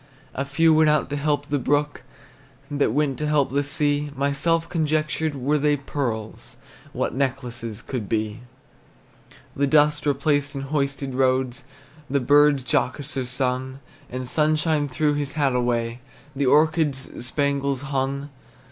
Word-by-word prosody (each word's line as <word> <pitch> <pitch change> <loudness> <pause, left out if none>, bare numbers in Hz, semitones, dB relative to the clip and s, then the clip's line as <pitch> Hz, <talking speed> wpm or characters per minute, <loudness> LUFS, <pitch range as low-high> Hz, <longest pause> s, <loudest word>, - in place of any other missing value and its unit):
A 140 - -2
few 160 +4 +3
went 155 0 +5
out 150 -1 +1
to - - -1
help 145 0 0
the 145 -1 -1
brook, 145 +3 0 0.7
That 145 -5 +1
went 145 +1 0
to 150 - -1
help 150 -3 +2
the 140 +1 +1
sea. 145 +1 +1
Myself 140 +5 +1
conjectured, 155 -2 -1
Were 140 +3 0
they 145 0 +2
pearls, 120 -6 -5 0.3
What - - -2
necklaces 125 -5 -3
could 120 -7 -5
be! 110 0 -1 1.2
The 140 +1 +1
dust 150 0 +3
replaced 145 0 +1
in 135 - -3
hoisted 140 -1 -2
roads, 130 -1 0 0.4
The 140 +1 +2
birds 145 +1 +4
jocoser 130 +2 -1
sung; 130 +1 -2 0.3
The 130 +1 -5
sunshine 155 +2 +1
threw 150 +3 +1
his 145 -1 -3
hat 145 -4 +1
away, 120 -1 0 0.4
The 140 -1 0
orchards 150 -3 +1
spangles 140 0 0
hung. 140 0 -2
140 Hz, 140 wpm, -23 LUFS, 130-150 Hz, 1.2 s, went